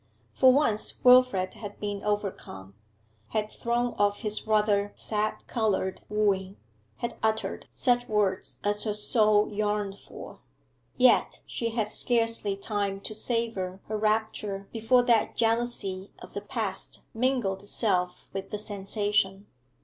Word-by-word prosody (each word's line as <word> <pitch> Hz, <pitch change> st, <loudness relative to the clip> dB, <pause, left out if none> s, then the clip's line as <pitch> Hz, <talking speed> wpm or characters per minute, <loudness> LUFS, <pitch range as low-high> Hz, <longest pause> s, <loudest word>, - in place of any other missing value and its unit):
For 260 Hz, -1 st, +6 dB
once 255 Hz, -6 st, +2 dB
Wilfrid 250 Hz, -7 st, +5 dB
had 205 Hz, -2 st, -9 dB
been 205 Hz, -1 st, -4 dB
overcome, 195 Hz, -, -4 dB, 0.5 s
had 215 Hz, -, -2 dB
thrown 240 Hz, +1 st, -1 dB
off 205 Hz, 0 st, +2 dB
his 215 Hz, -1 st, -2 dB
rather 210 Hz, -1 st, +2 dB
sad 215 Hz, 0 st, -2 dB
coloured 210 Hz, -5 st, -1 dB
wooing, 200 Hz, -2 st, 0 dB, 0.4 s
had 235 Hz, -1 st, -5 dB
uttered 220 Hz, 0 st, -1 dB
such 245 Hz, -2 st, +2 dB
words 205 Hz, -3 st, 0 dB
as 205 Hz, 0 st, +1 dB
her 210 Hz, -2 st, -1 dB
soul 210 Hz, -1 st, +3 dB
yearned 205 Hz, -1 st, -1 dB
for. -, -, -11 dB, 0.6 s
Yet 255 Hz, 0 st, +4 dB
she 230 Hz, -, -3 dB
had 220 Hz, -2 st, -2 dB
scarcely 230 Hz, -5 st, +1 dB
time 200 Hz, -1 st, -2 dB
to 215 Hz, -, -4 dB
savour 215 Hz, -5 st, -2 dB
her 215 Hz, -, -4 dB
rapture 215 Hz, -2 st, -1 dB
before 235 Hz, +2 st, +3 dB
that 235 Hz, -3 st, +2 dB
jealousy 225 Hz, -5 st, 0 dB
of -, -, -13 dB
the 200 Hz, -, -4 dB
past 205 Hz, -2 st, -3 dB
mingled 230 Hz, -6 st, 0 dB
itself 185 Hz, -3 st, 0 dB
with 195 Hz, 0 st, -5 dB
the 210 Hz, -, -3 dB
sensation. 205 Hz, -1 st, 0 dB
210 Hz, 130 wpm, -27 LUFS, 200-230 Hz, 0.6 s, For